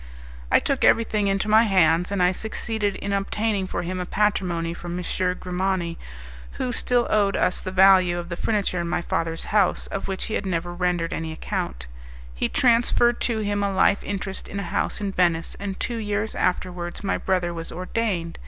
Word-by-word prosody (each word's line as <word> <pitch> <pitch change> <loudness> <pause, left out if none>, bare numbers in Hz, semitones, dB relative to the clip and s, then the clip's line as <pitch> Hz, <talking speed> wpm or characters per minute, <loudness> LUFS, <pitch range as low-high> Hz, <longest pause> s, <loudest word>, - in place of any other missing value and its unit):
I - - +7
took - - -1
everything 215 -3 +3
into 195 +1 0
my 215 +1 +6
hands, 180 -4 +3
and 195 -3 +1
I 180 - +4
succeeded 215 0 -2
in 200 +1 -3
obtaining 200 0 -1
for - - -3
him 185 +2 -3
a 180 - -2
patrimony 180 -5 0
from 175 0 -6
M. 180 - -4 0.4
Grimani, 180 -2 -1 0.6
who 250 - -2
still 245 0 +1
owed 200 -2 +3
us 180 - +1
the 185 - -4
value 185 -2 +5
of 175 0 -5
the 170 - -3
furniture 195 -2 0
in 170 - -3
my 175 0 -1
father's 165 -1 -2
house, 205 -3 +2
of 195 - -5
which 190 -1 -3
he 220 - -4
had 200 - -2
never 175 -1 -2
rendered 175 -2 -1
any 160 0 -3
account. 60 - -4 0.5
He - - -1
transferred 240 0 +3
to 225 -3 0
him 205 0 -1
a 200 -1 0
life 195 +1 +3
interest 195 -1 -4
in 200 - -5
a - - -3
house 195 +5 -1
in 200 -1 -2
Venice, 170 -3 +1
and 200 -1 -5
two 235 - -2
years 210 0 -2
afterwards 180 0 -2
my 195 - 0
brother 180 -2 0
was 165 -1 -6
ordained. 180 -2 -2
190 Hz, 190 wpm, -24 LUFS, 175-205 Hz, 0.6 s, I